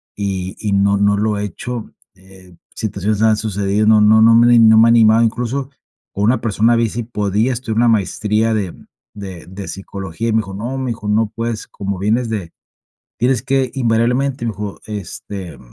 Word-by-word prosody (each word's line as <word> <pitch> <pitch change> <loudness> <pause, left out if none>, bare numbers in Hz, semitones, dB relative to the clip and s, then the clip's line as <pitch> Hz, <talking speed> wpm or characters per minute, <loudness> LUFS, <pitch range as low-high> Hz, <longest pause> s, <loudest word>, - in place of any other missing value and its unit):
y 95 -2 -3
y 105 -2 -2
no 100 +1 +3
no 100 0 +2
lo 105 0 0
he 100 - -3
hecho. 120 +4 -6 0.2
Eh, 95 -1 -18 0.2
situaciones 105 0 -2
han 110 -1 +4
sucedido, 100 0 -1
no 110 -1 +6
no 110 +1 +5
no 115 +1 +6
me 120 +1 +6
no 110 -1 +6
me 115 +1 +6
ha - - +4
animado. 115 0 +5
Incluso, 125 +4 -2 0.4
con 100 - -2
una 115 +2 +2
persona 115 +1 +2
vi, 115 -1 +2
si 120 +3 -4
podía 105 +1 -1
estudiar 115 -2 -4
una 120 0 +4
maestría 110 +1 +1
de 100 -5 -2 0.4
de 95 -5 -9
de 95 +1 -8
Psicología, 95 +2 -5
y - - +1
me - - +3
dijo: 100 -3 -6
"No, 120 +6 -4
mi 130 -2 -3
hijo, 110 -2 -7
no 105 0 +1
puedes. 115 -1 -4
Como 100 -2 -5
vienes 115 +4 0
de 100 -7 -4 0.7
Tienes 125 -1 +1
que 135 -2 0
invariablemente", 125 +2 0
me - - 0
dijo: 100 0 -7
"Este 95 -4 -7
110 Hz, 190 wpm, -17 LUFS, 100-115 Hz, 0.7 s, no